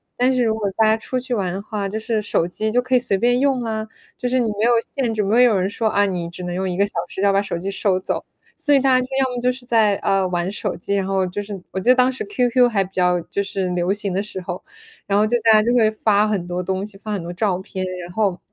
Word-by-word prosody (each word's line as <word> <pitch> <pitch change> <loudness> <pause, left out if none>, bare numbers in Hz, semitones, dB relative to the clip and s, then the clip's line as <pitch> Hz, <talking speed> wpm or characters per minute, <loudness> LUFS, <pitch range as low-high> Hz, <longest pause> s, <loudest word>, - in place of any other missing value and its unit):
但 255 +2 +2
是 250 -2 +2
如 220 - +2
果 205 -3 -2
大 220 - +4
家 220 - +4
出 255 +3 -3
去 250 -1 -3
玩 190 -4 -1
的 195 - -4
话， 205 -1 -4
就 220 - -3
是 220 -1 -1
手 170 -4 0
机 215 +5 -2
就 245 - +2
可 255 +1 0
以 - - +6
随 200 -5 0
便 245 +4 +2
用 270 -3 +1
啊， 220 -1 -3 0.3
就 250 - -2
是 255 +1 +2
你 240 - +1
没 210 - 0
有 240 - +4 0.2
限 255 -5 0
制， 215 - 0
没 220 +5 +4
有 240 -3 +5
人 185 -1 +1
会 - - -1
说， 220 +1 -1
啊， 205 0 +3
你 180 -3 -3
只 180 +1 -9
能 175 0 -4
用 190 +1 -1
1 180 - -3
个 200 - +3
小 205 - -4 0.2
时 190 - -4
要 200 0 +3
把 195 - +3
手 200 -4 -3
机 185 +3 -4
收 195 -1 +1
走。 185 - -3 0.4
所 290 - +2
以 280 - +6
大 270 0 +2
家 255 - -1
就 - - -12
要 265 - +3
么 - - -2
就 250 +1 +2
是 250 -1 -10
在， 220 -4 +3
呃， 195 -1 +1
玩 175 +1 -1
手 210 - -3
机， 200 +3 -2
然 195 -1 0
后 190 -1 0
就 195 +3 -4
是 200 -2 -7
我 190 - -2
记 225 - 0
得 - - +5
当 255 0 +4
时 260 - -4
QQ 250 - +2
还 200 -3 +2
比 185 - -10
较 180 -1 +1
就 200 +4 -3
是 195 -2 -2
流 180 +1 0
行 205 -1 0
的 190 +2 -1
时 200 -3 -5
候， 180 0 -6 0.4
然 200 0 +1
后 215 - +3
就 240 - +2
大 225 - +5
家 215 - +6
就 230 +3 +1
会 220 -3 +4
发 215 -1 +2
很 195 -5 -2
多 180 +1 -3
东 190 +1 -2
西， 205 -1 -7
发 210 +1 -5
很 200 - -2
多 170 +1 -6
照 185 0 0
片， 190 0 -5 0.2
然 175 - -9
后 200 -4 0
205 Hz, 330 characters per minute, -21 LUFS, 190-235 Hz, 0.4 s, 以